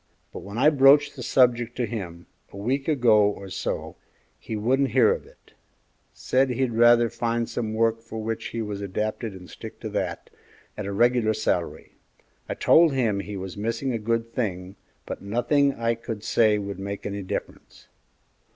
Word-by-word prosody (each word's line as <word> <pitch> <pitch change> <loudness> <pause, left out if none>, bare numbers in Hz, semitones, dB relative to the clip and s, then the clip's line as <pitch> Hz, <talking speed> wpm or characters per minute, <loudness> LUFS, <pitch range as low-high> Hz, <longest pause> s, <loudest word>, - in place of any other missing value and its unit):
But - - -6
when 100 +3 -8
I 150 +5 +5
broached 145 0 +5
the 130 - -8
subject 120 -1 +2
to 125 - 0
him, 90 -7 -6 0.3
a - - -11
week 130 +7 -2
ago 120 -8 +4
or 100 -2 -1
so, - - -4 0.4
he 110 - -6
wouldn't 130 +6 +1
hear 130 - +5
to - - -11
it; - - -25 0.6
said 130 +1 +1
he'd 125 -1 -1
rather 120 +1 +5
find 115 0 -2
some 110 -2 -3
work 115 0 +1
for 115 -1 -9
which 110 0 -3
he 115 -1 -4
was 105 -1 -5
adapted 105 +3 -3
and 90 -1 -11
stick - - -10
to - - -4
that, - - -4 0.4
at 105 -2 -5
a - - -3
regular 115 +1 +2
salary. 90 -5 -2 0.5
I - - -2
told 165 -3 +5
him 115 -7 +1
he 100 +1 -6
was 95 -1 -6
missing 115 +5 -2
a 115 - -2
good 115 +1 -2
thing, 95 -5 -3 0.3
but - - -6
nothing 120 +7 +2
that 135 - -5
I 115 0 +1
could 115 -2 -7
say 110 -2 +3
would 100 -2 -5
make 100 +1 -6
any 100 0 -4
difference." 95 - -7
115 Hz, 180 wpm, -25 LUFS, 100-120 Hz, 0.6 s, I